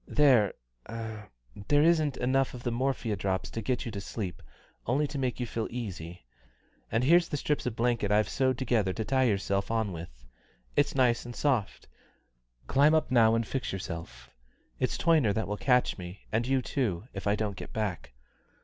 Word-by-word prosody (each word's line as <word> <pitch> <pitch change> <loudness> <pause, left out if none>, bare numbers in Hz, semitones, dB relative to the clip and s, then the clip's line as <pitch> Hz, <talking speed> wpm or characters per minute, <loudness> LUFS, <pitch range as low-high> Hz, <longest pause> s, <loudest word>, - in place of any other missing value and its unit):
There 130 -9 +4 0.3
there 105 - -2
isn't 155 -4 +3
enough 130 +1 +1
of 125 - -9
the 120 - -1
morphia 120 -3 -1
drops 95 -1 -2
to 115 - -4
get 125 +4 -1
you 115 - -4
to 100 -2 -5
sleep, 100 -3 -5 0.5
only 135 +6 +2
to 145 -1 -4
make 130 -2 -1
you 125 - -1
feel 115 -1 -3
easy; 90 - -6 0.7
and 115 +2 +1
here's 170 +5 +5
the 145 - -1
strips 145 -1 -1
of 115 - -2
blanket 115 -3 +1
I've 105 -1 +3
sewed 130 -2 +1
together 115 -7 +1
to 110 +1 -3
tie 130 -1 +2
yourself 100 -3 0
on 110 -3 0
with. 80 -9 -9 0.5
It's 145 - +2
nice 125 -3 +3
and 120 0 -8
soft 130 -9 -1 0.8
climb 145 +3 +4
up 155 - +1
now 115 -2 +5
and 115 0 0
fix 130 +2 -3
yourself. 85 -3 -7 0.5
It's - - 0
Toyner 155 -11 +3
that 110 - -1
will 105 - -2
catch 125 -4 +2
me, 90 +2 -9
and 115 +2 0
you 135 -1 +1
too, 110 -8 -2
if 95 +1 -5
I 100 - +3
don't 105 -2 -2
get - - -8
back. 100 - -3
115 Hz, 185 wpm, -29 LUFS, 100-130 Hz, 0.8 s, here's